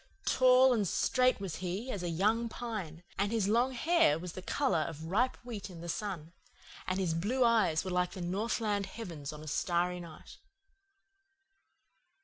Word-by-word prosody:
Tall 255 Hz, 0 st, +6 dB
and 210 Hz, -5 st, +1 dB
straight 255 Hz, +7 st, +2 dB
was 185 Hz, -5 st, -4 dB
he 190 Hz, +8 st, -4 dB
as 200 Hz, -, -4 dB
a 175 Hz, -, -2 dB
young 215 Hz, +7 st, +1 dB
pine, 205 Hz, -9 st, -6 dB, 0.2 s
and 200 Hz, +1 st, +1 dB
his 220 Hz, -4 st, +1 dB
long 240 Hz, +5 st, +2 dB
hair 280 Hz, -, +3 dB
was 175 Hz, +1 st, -7 dB
the 185 Hz, -, -7 dB
colour 260 Hz, -, +1 dB
of 155 Hz, 0 st, -4 dB
ripe 215 Hz, +10 st, +1 dB
wheat 215 Hz, -5 st, -6 dB
in 170 Hz, -3 st, -10 dB
the 170 Hz, -, -7 dB
sun; 175 Hz, -5 st, -4 dB, 0.5 s
and 185 Hz, -, 0 dB
his 185 Hz, -4 st, 0 dB
blue 215 Hz, +11 st, +1 dB
eyes 205 Hz, -8 st, +3 dB
were 185 Hz, -, -3 dB
like 180 Hz, 0 st, 0 dB
the 185 Hz, -, -7 dB
northland 205 Hz, +2 st, -1 dB
heavens 165 Hz, -11 st, -7 dB
on 150 Hz, 0 st, -9 dB
a -, -, -10 dB
starry 175 Hz, +3 st, 0 dB
night. 170 Hz, -3 st, -12 dB
195 Hz, 170 wpm, -32 LUFS, 170-230 Hz, 0.5 s, Tall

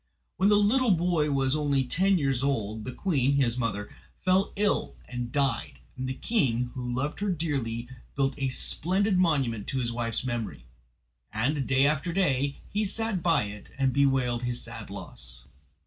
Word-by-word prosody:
When 190 Hz, +3 st, +4 dB
the 205 Hz, -, +5 dB
little 235 Hz, +5 st, +3 dB
boy 165 Hz, -3 st, +1 dB
was 135 Hz, -1 st, +1 dB
only 145 Hz, -3 st, +1 dB
ten 190 Hz, +9 st, +2 dB
years 135 Hz, -5 st, 0 dB
old 110 Hz, -6 st, -1 dB
the 125 Hz, -, -4 dB
queen, 140 Hz, -4 st, +1 dB
his 130 Hz, -4 st, +2 dB
mother, 115 Hz, -4 st, -2 dB, 0.4 s
fell 185 Hz, +2 st, +3 dB
ill 205 Hz, 0 st, +1 dB
and 125 Hz, -1 st, -5 dB
died, 135 Hz, -, 0 dB, 0.2 s
and 130 Hz, 0 st, -4 dB
the 130 Hz, -, -3 dB
king, 125 Hz, -, +1 dB
who 125 Hz, -2 st, -4 dB
loved 130 Hz, +5 st, -2 dB
her 205 Hz, 0 st, -1 dB
dearly, 135 Hz, -9 st, -2 dB, 0.3 s
built 135 Hz, 0 st, +1 dB
a 135 Hz, -1 st, 0 dB
splendid 185 Hz, +8 st, +2 dB
monument 135 Hz, -, +1 dB
to 135 Hz, -, -2 dB
his 120 Hz, -2 st, -1 dB
wife's 115 Hz, -1 st, -2 dB
memory, 120 Hz, -, -4 dB, 0.7 s
and 135 Hz, +5 st, 0 dB
day 135 Hz, +1 st, +4 dB
after 150 Hz, +4 st, +1 dB
day 140 Hz, -7 st, +1 dB
he 210 Hz, +1 st, -1 dB
sat 215 Hz, -2 st, -1 dB
by 165 Hz, -7 st, +3 dB
it 105 Hz, 0 st, -8 dB
and 135 Hz, -2 st, +2 dB
bewailed 135 Hz, -4 st, +2 dB
his 120 Hz, -1 st, -1 dB
sad -, -, -7 dB
loss. -, -, -5 dB
135 Hz, 170 wpm, -28 LUFS, 120-170 Hz, 0.7 s, the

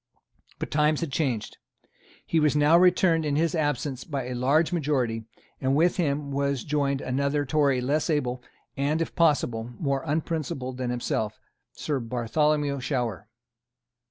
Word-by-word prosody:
But -, -, -5 dB
times 150 Hz, +1 st, +2 dB
had 165 Hz, -4 st, -3 dB
changed. 130 Hz, -7 st, -2 dB, 0.7 s
He 165 Hz, -, +1 dB
was 150 Hz, -2 st, +2 dB
now 150 Hz, +2 st, +5 dB
returned 175 Hz, -2 st, +4 dB
in 145 Hz, -2 st, 0 dB
his 160 Hz, +1 st, +1 dB
absence 145 Hz, -4 st, -1 dB
by 140 Hz, -5 st, -3 dB
a -, -, -3 dB
large 145 Hz, +8 st, +2 dB
majority; 130 Hz, -9 st, 0 dB, 0.4 s
and 135 Hz, 0 st, +1 dB
with 170 Hz, +5 st, +3 dB
him 145 Hz, -4 st, -1 dB
was 140 Hz, -2 st, -1 dB
joined 140 Hz, -2 st, 0 dB
another 140 Hz, +3 st, 0 dB
Tory 140 Hz, -3 st, +2 dB
less 145 Hz, +6 st, 0 dB
able 130 Hz, -5 st, 0 dB, 0.3 s
and, 145 Hz, +3 st, 0 dB
if 165 Hz, -, -2 dB
possible, 120 Hz, -8 st, +1 dB
more 140 Hz, -3 st, 0 dB
unprincipled 150 Hz, -5 st, -3 dB
than 125 Hz, -1 st, -2 dB
himself, 110 Hz, -3 st, -2 dB, 0.4 s
Sir 145 Hz, -3 st, -2 dB
Bartholomew 140 Hz, +5 st, 0 dB
Shower. 120 Hz, -7 st, -2 dB
140 Hz, 145 wpm, -26 LUFS, 130-155 Hz, 0.7 s, now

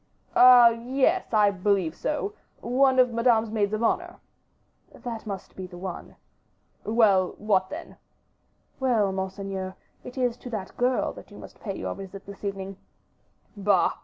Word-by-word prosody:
"Ah! 250 Hz, -1 st, +9 dB
yes, 260 Hz, +10 st, 0 dB
I 210 Hz, -2 st, +4 dB
believe 190 Hz, -3 st, 0 dB
so; 355 Hz, +7 st, -2 dB, 0.3 s
one 260 Hz, +2 st, +3 dB
of 250 Hz, -2 st, +4 dB
Madame's 230 Hz, -2 st, +2 dB
maids 210 Hz, -2 st, 0 dB
of 215 Hz, +2 st, -2 dB
honor." -, -, 0 dB, 0.8 s
"That 230 Hz, -3 st, -7 dB
must 195 Hz, -2 st, -7 dB
be 185 Hz, -1 st, -6 dB
the 175 Hz, -1 st, -11 dB
one." 185 Hz, -1 st, -7 dB, 0.7 s
"Well, 210 Hz, -5 st, +3 dB
what 195 Hz, -3 st, +1 dB
then?" 325 Hz, +3 st, -8 dB, 0.8 s
"Well, 230 Hz, -7 st, +2 dB
monseigneur, 190 Hz, 0 st, -4 dB, 0.3 s
it 250 Hz, +1 st, -10 dB
is 245 Hz, -2 st, 0 dB
to 250 Hz, -, -9 dB
that 215 Hz, -5 st, -4 dB
young -, -, -23 dB
girl 250 Hz, +1 st, +1 dB
that -, -, -13 dB
you -, -, -13 dB
must -, -, -12 dB
pay -, -, -5 dB
your -, -, -3 dB
visit 195 Hz, 0 st, -10 dB
this 200 Hz, +1 st, -11 dB
evening." 195 Hz, -1 st, -5 dB, 0.8 s
"Bah! 200 Hz, -2 st, +3 dB
215 Hz, 155 wpm, -26 LUFS, 195-245 Hz, 0.8 s, Ah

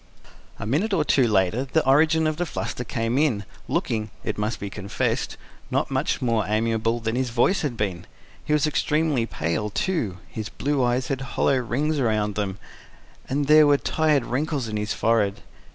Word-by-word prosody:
A -, -, -6 dB
minute 185 Hz, -, +1 dB
or 155 Hz, -, +1 dB
two 130 Hz, -5 st, +3 dB
later 100 Hz, +3 st, +2 dB
the 155 Hz, +4 st, +1 dB
origin 155 Hz, +4 st, +4 dB
of 155 Hz, -1 st, 0 dB
the 175 Hz, -, 0 dB
fluster 125 Hz, -, -4 dB
came 115 Hz, +2 st, -1 dB
in, 120 Hz, -10 st, +1 dB, 0.2 s
looking, 110 Hz, -1 st, -1 dB
it -, -, -2 dB
must 105 Hz, +2 st, -2 dB
be 100 Hz, -, -4 dB
confessed, 100 Hz, 0 st, -2 dB, 0.3 s
not -, -, 0 dB
much -, -, 0 dB
more 115 Hz, -3 st, +2 dB
amiable 115 Hz, +2 st, 0 dB
than 110 Hz, 0 st, -2 dB
his 130 Hz, 0 st, 0 dB
voice 120 Hz, +11 st, +2 dB
had 135 Hz, -6 st, -2 dB
been: 95 Hz, -5 st, -3 dB, 0.4 s
he -, -, -4 dB
was 150 Hz, 0 st, +3 dB
extremely 150 Hz, -4 st, +1 dB
pale, 85 Hz, +6 st, -2 dB
too, 110 Hz, -, -1 dB
his 110 Hz, -2 st, -6 dB
blue 140 Hz, -2 st, -1 dB
eyes 125 Hz, +1 st, 0 dB
had 135 Hz, -1 st, -2 dB
hollow 135 Hz, +1 st, +1 dB
rings 140 Hz, +5 st, 0 dB
round 110 Hz, -3 st, +1 dB
them, 100 Hz, -2 st, -2 dB, 0.7 s
and 145 Hz, +2 st, 0 dB
there 155 Hz, +1 st, +7 dB
were 145 Hz, -1 st, +5 dB
tired 150 Hz, -4 st, +1 dB
wrinkles 140 Hz, 0 st, -1 dB
on 110 Hz, -, -4 dB
his 105 Hz, 0 st, -2 dB
forehead. 105 Hz, -3 st, +1 dB
120 Hz, 180 wpm, -24 LUFS, 110-150 Hz, 0.7 s, there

